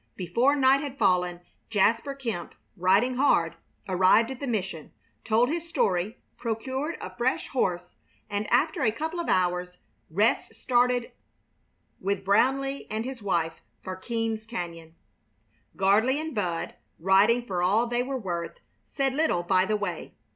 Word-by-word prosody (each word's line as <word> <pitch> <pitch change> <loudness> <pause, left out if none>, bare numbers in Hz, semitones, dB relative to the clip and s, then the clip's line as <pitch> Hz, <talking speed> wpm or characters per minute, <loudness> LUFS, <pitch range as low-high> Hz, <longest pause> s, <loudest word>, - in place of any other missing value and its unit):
Before 235 - +2
night 270 -1 +4
had 280 -2 -6
fallen 180 -5 +2 0.3
Jasper 230 +6 +2
Kemp, 230 -11 -5 0.2
riding 200 +7 +3
hard, 170 - +3 0.3
arrived 190 +6 +4
at 260 - -7
the 280 - -4
mission, 195 -9 -3 0.3
told 230 +2 +3
his 335 +2 -3
story, 195 - 0 0.2
procured 260 +7 -3
a - - -8
fresh 245 +2 -1
horse, 180 -8 -2 0.3
and 205 0 -2
after 310 +7 +2
a 225 -5 +3
couple 320 +9 -4
of 340 - -3
hours, 180 0 0 0.3
rest 205 +8 +1
started 245 -1 +1 0.9
with 195 0 -2
Brownleigh 270 +7 +2
and 220 +2 -3
his 260 -2 -6
wife 170 -5 -1 0.2
for 185 -1 -5
Keams 225 +2 -3
Cañon. 170 -7 -6 0.8
Gardley 215 +8 +3
and 315 0 -4
Bud, 180 -7 -2 0.2
riding 195 +7 +4
for 180 -5 -2
all 205 +6 +3
they 240 0 0
were 265 +1 -2
worth, 175 -7 -4 0.3
said 270 -2 0
little 275 - +1
by 185 +1 +3
the 215 - +1
way. 190 -5 -5
220 Hz, 145 wpm, -27 LUFS, 185-260 Hz, 0.9 s, night